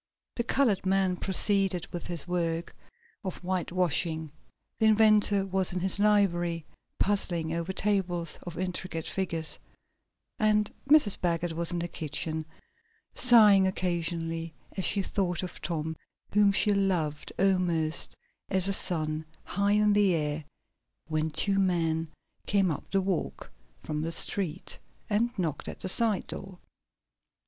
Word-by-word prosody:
The 235 - 0
colored 235 -5 +2
man 190 -1 +2
proceeded 195 -1 +2
with 175 - -5
his 175 -2 -4
work 170 -1 -2 0.5
of 185 -3 -4
whitewashing, 175 -3 -1 0.5
the 220 - +4
inventor 215 -2 +4
was 190 -1 0
in 180 - -1
his 190 +2 0
library, 175 -6 +2 0.3
puzzling 175 -5 0
over 170 +2 -2
tables 185 -5 0
of 175 -2 -8
intricate 180 -2 -3
figures, 165 -4 -2 0.8
and 210 -1 +2 0.2
Mrs. 290 -10 +5
Baggert 175 -1 0
was 170 +1 -2
in 175 - -2
the 170 0 -2
kitchen, 155 0 -4 0.7
sighing 210 -6 +6
occasionally 165 -3 -2 0.2
as 190 - -2
she 200 -1 +2
thought 185 -3 -1
of 180 - -7
Tom, 160 -1 -3 0.4
whom 205 -1 +5
she 205 +1 +3
loved 175 -7 -1
almost 175 -5 +1 0.3
as 190 -1 +2
a 195 - +2
son, 155 -4 0 0.2
high 200 0 0
in 210 0 +4
the 200 -3 +4
air, 150 0 -2 0.7
when 155 0 0
two 195 +5 +2
men 165 -4 +1 0.4
came 195 -3 +3
up 150 - -6
the 195 - +1
walk, 185 -3 -3 0.3
from 150 0 -3
the 165 +1 -2
street, 180 0 -2 0.3
and 225 +3 +2
knocked 160 -6 -2
at - - -7
the 185 - -1
side 220 0 +2
door. 195 -2 -7
180 Hz, 135 wpm, -28 LUFS, 165-195 Hz, 0.8 s, sighing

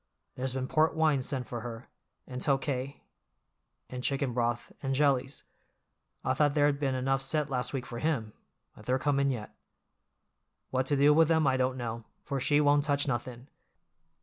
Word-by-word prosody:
There's 130 0 -3
been 130 -1 -2
port 155 +3 +2
wine 155 -4 +3
sent 130 0 -3
for 120 -2 -5
her, 115 0 -7 0.4
and 125 0 -6
Tokay, 135 -1 -1 0.8
and 125 0 -7
chicken 135 -2 0
broth, 120 0 -1
and 135 -1 -1
jellies—I 135 -1 -3
thought 145 +2 +2
there'd 145 -1 +3
been 135 -3 0
enough 135 +1 0
sent 150 +1 0
last 125 -2 -1
week 135 -3 -3
for 120 - -6
him, 120 -9 -1 0.4
but 105 - -14
they're 130 +1 +2
comin' 140 0 +1
yet. 120 -6 -4 1.2
What 130 0 0
to 145 - +2
do 145 +2 +6
with 160 +1 +5
'em 160 -2 +3
I 135 -1 +3
don't 130 0 0
know, 115 -2 -5 0.2
for 140 - -3
she 145 +2 +3
won't 145 -1 +4
touch 145 -1 0
nothin'. 125 0 -4
135 Hz, 170 wpm, -30 LUFS, 125-145 Hz, 1.2 s, do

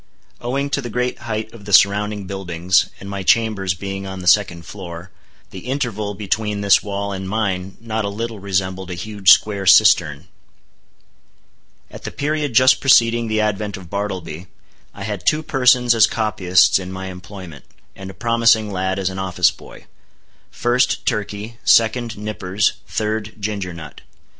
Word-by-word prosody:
Owing 140 +4 -2
to 140 - 0
the 120 - -6
great 125 +2 -2
height 110 -2 -5
of 110 -4 -13
the 100 - -7
surrounding 105 +1 +3
buildings, 90 -2 0
and 100 - -10
my 100 0 -5
chambers 95 -3 +1
being 95 +1 -6
on 95 0 -6
the 90 - -8
second 90 -3 +3
floor, 90 -2 -9 0.4
the 95 +5 -10
interval 110 -7 -3
between 105 +1 -2
this 100 -1 +4
wall 100 0 -4
and 95 -1 -5
mine 95 -3 -2
not 110 -1 -3
a 100 - -2
little 115 +1 -5
resembled 95 -1 -2
a 90 - -4
huge 100 +1 -1
square 100 -1 +4
cistern. - - +5 1.7
At - - -11
the - - -4
period 150 -3 -2
just 130 +1 +5
preceding 120 -3 +4
the 110 0 0
advent 105 -1 -2
of 90 -3 -13
Bartleby, 95 -4 -5 0.4
I 100 - -9
had 100 -3 -5
two 155 - +1
persons 125 -4 +3
as 110 -1 +5
copyists 95 -5 +2
in 95 0 -7
my 95 0 -6
employment, 90 -4 -10 0.3
and 95 0 -9
a 95 - -11
promising 115 -2 +2
lad 95 0 -1
as 95 -1 -1
an 95 - -6
office 95 -2 +2
boy. - - -15 0.6
First, 120 +1 0
Turkey; 105 +2 -3
second, 115 0 +3
Nippers; 105 -1 -1
third, 110 0 -3
Ginger 100 -3 -3
Nut. 80 -3 -11
100 Hz, 160 wpm, -19 LUFS, 95-110 Hz, 1.7 s, cistern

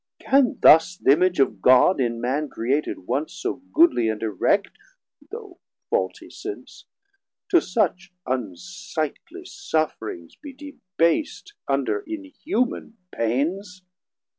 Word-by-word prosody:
Can 270 -3 +2
thus 165 +4 +6
Th' - - -1
Image 180 +4 +4
of 110 -8 +1
God 130 - +5
in 120 -2 -1
man 135 +5 -2
created 130 -4 -2
once 145 - -2
So 190 - -3
goodly 310 - +4
and 110 0 -4
erect, 110 - +1 0.6
though 420 -5 -10 0.3
faultie - - -2
since, 405 0 -9 0.6
To 355 -4 +5
such 185 +1 -1
unsightly 155 - -5
sufferings 115 - -4
be 290 -2 -11
debas't 280 - -2
Under 420 - 0
inhuman 295 - -3 0.2
pains? 180 - -2
180 Hz, 110 wpm, -23 LUFS, -, 0.6 s, thus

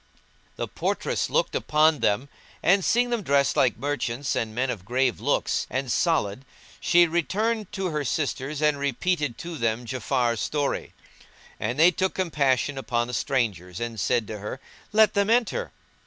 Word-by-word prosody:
"[FN#174] - - -35
The - - -3
portress - - -1
looked - - +1
upon 155 0 +3
them 105 +7 +1 0.4
and 195 +2 +4
seeing 245 +4 +2
them 235 -2 0
dressed 140 -5 +2
like 125 -4 +3
merchants 140 -2 -2
and 110 -1 -2
men 130 +1 0
of 105 -7 -6
grave 125 +3 0
looks - - 0
and 130 -1 -2
solid, 130 - +1 0.4
she 175 0 +5
returned 205 +6 -1
to 190 -3 -2
her 150 -1 -1
sisters 145 +1 -2
and 150 -2 +3
repeated 140 0 -1
to 170 -3 -7
them 115 +1 0
Ja'afar's 120 -1 0
story; 145 -2 -2 0.6
and 120 +5 -2
they 165 +4 +7
took 190 +2 -1
compassion 145 -6 +1
upon 120 -3 -1
the 125 - -7
strangers 105 -9 -1
and 115 -2 -4
said 120 +4 +1
to 105 0 -6
her, 105 +6 -6 0.3
"Let 215 -1 +5
them 200 0 +1
enter." 245 - +1
140 Hz, 165 wpm, -25 LUFS, 120-175 Hz, 0.6 s, they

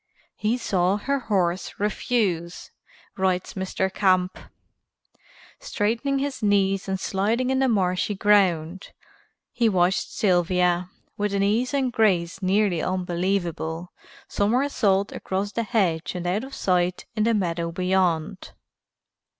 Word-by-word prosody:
"He 220 +3 0
saw 190 -4 +1
her 280 +6 -1
horse 185 -6 -1
refuse," 195 -5 -1 0.5
writes 185 -1 0
Mr. 190 0 -2
Camp, 185 -2 +2 1.2
"straightening 275 - -1
his 275 -1 -3
knees 195 -2 +2
and 190 0 -2
sliding 225 +8 0
in 265 - +1
the 265 - +3
marshy 195 -2 0
ground. 190 -4 +1 0.6
He 235 -2 +2
watched 185 -1 +1
Sylvia, 180 -1 +1 0.3
with 205 -1 -1
an 195 - +1
ease 225 +5 +1
and 265 -3 0
grace 190 -5 +1
nearly 190 -2 +1
unbelievable, 175 -2 -2 0.3
somersault 205 -3 +1
across 195 +2 -3
the 220 - -1
hedge 185 -9 0
and 180 -1 -4
out 190 +6 0
of 270 - -9
sight 180 -1 0
in 215 - +1
the 230 0 +2
meadow 170 -4 -1
beyond." 180 -3 -1
190 Hz, 120 wpm, -24 LUFS, 180-215 Hz, 1.2 s, the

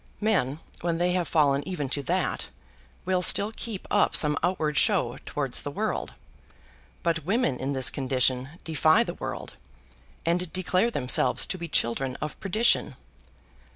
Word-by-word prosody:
Men 170 - 0 0.2
when 170 -1 -1
they 175 +1 +1
have 180 -2 0
fallen 140 -3 +3
even 165 -7 -3
to 140 - -1
that, 135 - -1 0.6
will 185 0 +1
still 200 +4 +1
keep 215 -5 -6
up - - +3
some 150 -1 +5
outward 155 -4 0
show - - +2
towards - - 0
the - - -5
world; - - -3 0.9
but 165 -1 0
women 190 - 0
in 135 +2 -2
this 130 -2 +3
condition 130 -1 +1
defy 160 +6 +3
the - - -5
world, - - -6 0.7
and 170 0 0
declare 185 +4 +1
themselves 125 - +2
to - - -4
be 170 - -5
children 130 -2 0
of 150 +1 -6
perdition. 215 +5 +2
165 Hz, 150 wpm, -26 LUFS, 135-185 Hz, 0.9 s, some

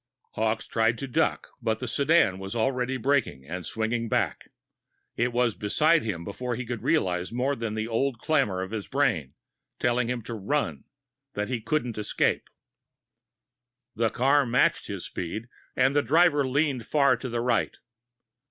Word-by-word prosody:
Hawkes 110 0 -1
tried 115 0 +1
to 135 - -5
duck, 125 - 0
but 110 -1 0
the 125 - -5
sedan 140 - +3
was 95 +4 -6
already 130 +2 0
braking 130 - 0
and 90 +5 -5
swinging 115 +3 -2
back. - - -1 0.7
It 120 +1 +1
was 120 -1 +2
beside 155 +12 +3
him 95 -7 -3
before 120 +6 -4
he 125 +2 -4
could 120 -1 -4
realize 90 +1 0
more 130 +4 0
than 115 -3 -3
the 110 0 -2
old 120 +2 0
clamor 115 -10 +1
of 95 - -7
his 110 -3 -4
brain, 120 - 0 0.4
telling 120 0 +1
him 125 -2 -2
to 120 - -6
run, 115 +8 -2 0.5
that 105 +2 -2
he 125 -3 -2
couldn't 125 -5 -1
escape. 105 - 0 1.5
The 115 0 +2
car 140 +5 +3
matched 125 0 +2
his - - -5
speed, 105 +7 -5 0.3
and 130 +2 +3
the 145 - +5
driver 145 +1 +4
leaned 135 -3 0
far 140 -3 +4
to 130 +2 -5
the 120 0 -1
right. 120 -1 0
120 Hz, 160 wpm, -27 LUFS, 110-135 Hz, 1.5 s, the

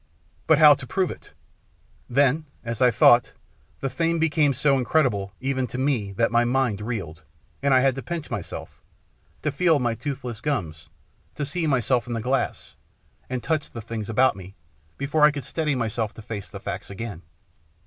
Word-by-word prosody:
But 160 - +6
how 150 -1 +9
to 140 -2 -7
prove 185 +7 0
it? - - -12 0.8
Then, 140 +4 +2 0.2
as 115 0 -5
I 125 - +6
thought, 120 0 +5 0.5
the 135 - 0
thing 165 0 0
became 155 -2 +2
so 140 +2 +2
incredible, 120 -8 +1
even 130 -1 -1
to 125 - -6
me, 130 -7 0
that 115 +4 +1
my 120 0 +4
mind 120 -4 0
reeled, 95 -8 -5 0.4
and 140 0 +2
I 130 -1 +6
had 135 0 +3
to 135 - -6
pinch 170 -1 -5
myself, - - -6 0.6
to - - 0
feel 165 0 +3
my 120 -4 0
toothless 125 -3 -5
gums, 85 - -3 0.5
to 145 - -2
see 160 +3 -2
myself 125 -3 +1
in 120 - -3
the 115 - -2
glass, 130 +4 -2 0.5
and 125 -1 -3
touch 155 -2 -1
the 115 - -8
things 110 -1 -5
about 130 +4 +3
me, 95 0 -11 0.4
before 145 +2 +1
I 150 - +9
could 145 -2 -5
steady 155 -4 -1
myself 115 -2 -2
to 110 - -10
face 105 -3 -6
the - - -8
facts - - -6
again. 100 -3 -6
130 Hz, 180 wpm, -24 LUFS, 115-145 Hz, 0.8 s, how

